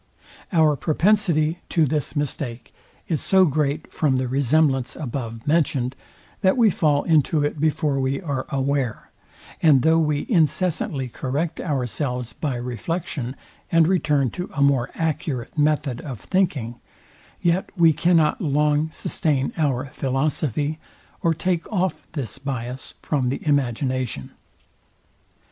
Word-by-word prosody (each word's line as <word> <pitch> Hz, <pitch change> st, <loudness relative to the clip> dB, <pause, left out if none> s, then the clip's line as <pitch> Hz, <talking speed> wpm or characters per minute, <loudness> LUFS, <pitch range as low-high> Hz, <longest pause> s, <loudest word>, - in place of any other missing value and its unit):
Our 160 Hz, -4 st, +4 dB
propensity 165 Hz, -, +2 dB
to 165 Hz, -3 st, +3 dB
this 150 Hz, +2 st, -2 dB
mistake 135 Hz, -4 st, -3 dB, 0.3 s
is 160 Hz, -4 st, -1 dB
so 190 Hz, -1 st, +4 dB
great 150 Hz, 0 st, -1 dB
from 145 Hz, -4 st, +1 dB
the 130 Hz, 0 st, 0 dB
resemblance 135 Hz, 0 st, +2 dB
above 115 Hz, -5 st, -5 dB
mentioned, 145 Hz, -5 st, +1 dB, 0.5 s
that 190 Hz, +5 st, +3 dB
we 225 Hz, -4 st, +5 dB
fall 150 Hz, -4 st, +2 dB
into 155 Hz, -1 st, +2 dB
it 145 Hz, 0 st, -3 dB
before 150 Hz, -2 st, +1 dB
we 135 Hz, +1 st, 0 dB
are 140 Hz, -7 st, -3 dB
aware; 135 Hz, -4 st, -1 dB, 0.5 s
and 145 Hz, -6 st, +5 dB
though 160 Hz, +1 st, +4 dB
we 150 Hz, -2 st, 0 dB
incessantly 160 Hz, -, +1 dB
correct 140 Hz, +7 st, -3 dB
ourselves 125 Hz, -4 st, -2 dB
by 145 Hz, -5 st, -3 dB
reflection, 125 Hz, +2 st, -4 dB, 0.4 s
and 165 Hz, -1 st, +5 dB
return 150 Hz, -, +2 dB
to 180 Hz, -, -5 dB
a 140 Hz, -, -1 dB
more 135 Hz, -3 st, +3 dB
accurate 150 Hz, -6 st, -2 dB
method 150 Hz, -4 st, +1 dB
of 130 Hz, -8 st, -7 dB
thinking, 135 Hz, -, -1 dB, 0.6 s
yet 175 Hz, +2 st, +1 dB
we 165 Hz, -2 st, +6 dB
cannot 165 Hz, +2 st, +2 dB
long 150 Hz, 0 st, +2 dB
sustain 145 Hz, -4 st, -1 dB
our 135 Hz, -4 st, -1 dB
philosophy, 145 Hz, +2 st, -1 dB, 0.4 s
or 165 Hz, -1 st, +2 dB
take 180 Hz, +2 st, -1 dB
off 185 Hz, -3 st, -1 dB
this 135 Hz, -4 st, -4 dB
biass 130 Hz, -2 st, -5 dB
from 135 Hz, -5 st, 0 dB
the 135 Hz, +4 st, -4 dB
imagination. 130 Hz, -, -1 dB
145 Hz, 125 wpm, -23 LUFS, 130-160 Hz, 0.6 s, we